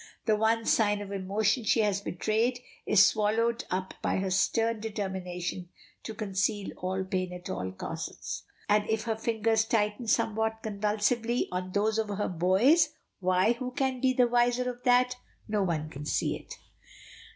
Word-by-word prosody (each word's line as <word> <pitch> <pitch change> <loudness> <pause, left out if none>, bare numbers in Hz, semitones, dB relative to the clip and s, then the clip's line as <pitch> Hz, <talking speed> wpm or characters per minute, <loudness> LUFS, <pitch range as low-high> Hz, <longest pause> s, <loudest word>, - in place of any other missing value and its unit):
The 220 - +3
one 225 +1 +1
sign 205 -2 +3
of 205 -1 -7
emotion 200 +4 0
she 220 - +3
has 205 -2 +1
betrayed 220 +6 0 0.3
is 200 -1 +7
swallowed 225 +3 +1
up 185 +1 -2
by - - 0
her 190 0 -1
stern 225 +4 +1
determination 185 -4 -4 0.3
to 220 - -7
conceal 205 0 -1
all 190 +1 -2
pain 185 -1 -2
at 180 0 -7
all 95 0 -3
costs, 95 - -6 0.3
and 210 +1 +2
if 220 0 0
her 225 -1 -1
fingers 220 0 +1
tighten 220 +1 0
somewhat 220 +1 0
convulsively 215 +3 0
on 180 0 -3
those 215 +2 +1
of 220 - 0
her 205 0 -1
boy's, 200 - +4 0.3
why, 185 +4 +3
who 250 +1 -5
can 260 -1 -1
be 260 -1 +4
the 250 -1 +3
wiser 245 +1 +2
of 245 0 -14
that? 250 0 +4 0.3
No 210 -1 0
one 165 -5 -1
can 150 0 -8
see 140 - 0
it. - - -10
215 Hz, 165 wpm, -29 LUFS, 190-230 Hz, 0.3 s, is